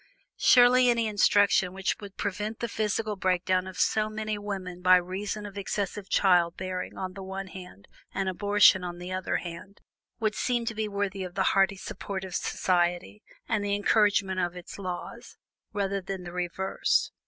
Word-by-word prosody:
Surely, 250 0 +6
any 235 -1 +2
instruction 205 -3 +3
which 195 0 -1
would 200 -2 -11
prevent 210 +2 -3
the 235 - -2
physical 215 0 -1
breakdown 185 0 +1
of 190 - -9
so 215 0 +2
many 215 0 -3
women 190 -3 -6
by 185 0 +7
reason 195 +4 -2
of 200 0 -7
excessive 200 0 -3
child 175 -3 +3
bearing 185 -1 -5
on 185 -1 -4
the 195 - -8
one 190 +1 -5
hand, 180 - -11 0.2
and 195 -1 -2
abortion 200 0 +4
on 175 -1 -5
the 180 +1 -7
other 185 0 -2
hand, 175 +3 -6 0.4
would 215 -2 0
seem 240 0 -1
to 225 - -2
be 215 0 -2
worthy 200 -1 -2
of 180 -1 -8
the 195 - +2
hearty 195 0 +3
support 190 -1 -6
of 190 -2 -7
society, 175 - 0 0.3
and 215 -2 0
the 200 0 0
encouragement 205 -2 +2
of 175 -1 -1
its 180 +2 -9
laws, 180 -2 -7 0.3
rather 200 -1 -1
than 190 0 -5
the 175 -1 -8
reverse. 180 +2 0
195 Hz, 175 wpm, -28 LUFS, 185-205 Hz, 0.4 s, by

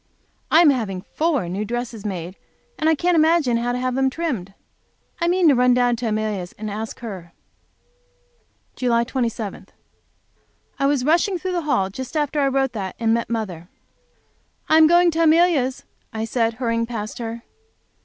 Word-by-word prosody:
I 325 - +6
am 315 -4 +6
having 200 -8 -3
four 300 - -1
new 190 +4 -3
dresses 235 -1 -4
made, 180 -2 -5 0.4
and 315 - +2
I 320 - +4
can't 350 +4 +1
imagine 315 -6 +3
how 240 +1 -1
to 245 - -2
have 255 0 -1
them 265 +1 +2
trimmed. 255 - -4 0.6
I 340 - 0
mean 355 0 +3
to 295 - +6
run 250 -1 +4
down 245 -1 +2
to 235 - -3
Amelia's 215 -4 -2
and 215 0 -6
ask 220 +3 -6
her. 185 -7 -8 1.4
July 235 -2 +1
27. 235 -4 -4 1.1
I 275 - +1
was 280 -3 +1
rushing 350 +5 +2
through 370 +2 -4
the 350 -1 -1
hall 195 -9 +1
just 260 +8 -6
after 295 0 0
I 280 - +3
wrote 270 -1 +1
that, 195 -4 -5
and 225 -1 +1
met 230 -1 -1
mother. 190 -7 -4 1.0
"I 315 - +5
am 315 - +7
going 345 +1 +5
to 330 +1 -1
Amelia's," 320 -5 +3 0.3
I 220 0 -3
said, 225 -1 0
hurrying 230 -1 -1
past 215 -2 -5
her. 230 0 -5
245 Hz, 175 wpm, -22 LUFS, 220-305 Hz, 1.4 s, am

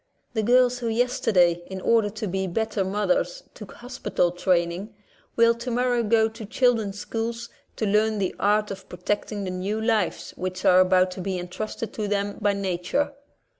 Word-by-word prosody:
The 220 - 0
girls 245 +2 +4
who 240 - -3
yesterday, 210 -7 +2
in 190 0 -6
order 220 +1 +3
to 215 +1 -5
be 190 +1 -2
better 220 +2 -1
mothers, 210 - 0
took - - -11
hospital 245 -8 -1
training, 180 +3 0 0.4
will 230 0 +5
tomorrow 245 +1 0
go 220 0 +3
to 220 +1 -9
children's 220 -2 +1
schools 230 +2 -4 0.3
to 220 - -2
learn 215 +1 +2
the 190 -2 -1
art 210 +1 +2
of 190 -1 -8
protecting 205 +3 -3
the 185 - -3
new 190 +4 -2
lives 215 -7 0
which 185 0 -5
are 180 - +7
about 185 0 +4
to 185 - -6
be 190 0 -2
entrusted 195 +5 -5
to 215 -2 -3
them 205 0 -2
by 205 -1 +3
nature. 195 +9 -1
210 Hz, 170 wpm, -25 LUFS, 185-230 Hz, 0.4 s, are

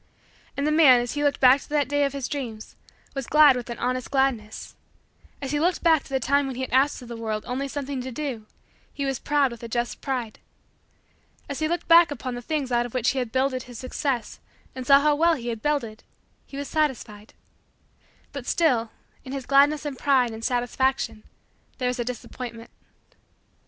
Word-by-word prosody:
And 280 - 0
the 305 - +2
man, 300 -6 +7
as 240 0 -3
he 290 0 -2
looked 285 -1 +1
back 260 +1 +6
to - - -14
that 295 -2 +1
day 290 +1 +1
of 275 - -2
his 275 -3 -3
dreams, 245 -8 -6 0.4
was 270 -3 -4
glad 300 -3 +6
with 245 -1 -5
an 235 - -5
honest 255 0 -2
gladness. 265 -6 -1 0.7
As 270 - -3
he 295 - 0
looked 350 +3 0
back 325 -3 +5
to - - -16
the 265 -1 0
time 280 +3 +1
when 265 - -5
he 260 - -5
had - - -5
asked 270 0 +2
of - - -11
the 235 - -7
world 220 -2 -3
only 265 +3 -3
something 275 -1 -4
to 260 +1 -6
do, 250 -5 -5 0.4
he 280 - -4
was 270 -2 -2
proud 285 -3 +1
with 235 - -10
a 235 - -6
just 240 +1 -3
pride. 245 -5 -4 1.1
As 280 - -5
he 310 - +1
looked 345 +1 -3
back 335 0 +7
upon 255 -3 -5
the 245 - -6
things 280 0 -3
out 240 0 +1
of 245 - -14
which 250 -1 +2
he 270 - -2
had 245 -3 -3
builded 260 0 0
his 245 - -9
Success 255 -1 -3 0.3
and 255 -1 -7
saw 275 0 +7
how 300 0 +3
well 330 +3 +3
he 240 -4 -5
had 225 -2 -4
builded, 240 -7 -2 0.4
he 275 - -9
was 285 0 -4
satisfied. 240 -8 -2 1.0
But 280 -3 -7
still 245 -9 +2 0.3
in 260 - -8
his 270 -2 -5
gladness 285 +2 +4
and 280 -3 -5
pride 260 -4 +3
and 220 0 -8
satisfaction 245 -1 0 0.6
there 250 -2 0
was 250 0 -3
a - - +1
disappointment. 240 -1 -7
265 Hz, 210 wpm, -25 LUFS, 240-285 Hz, 1.1 s, man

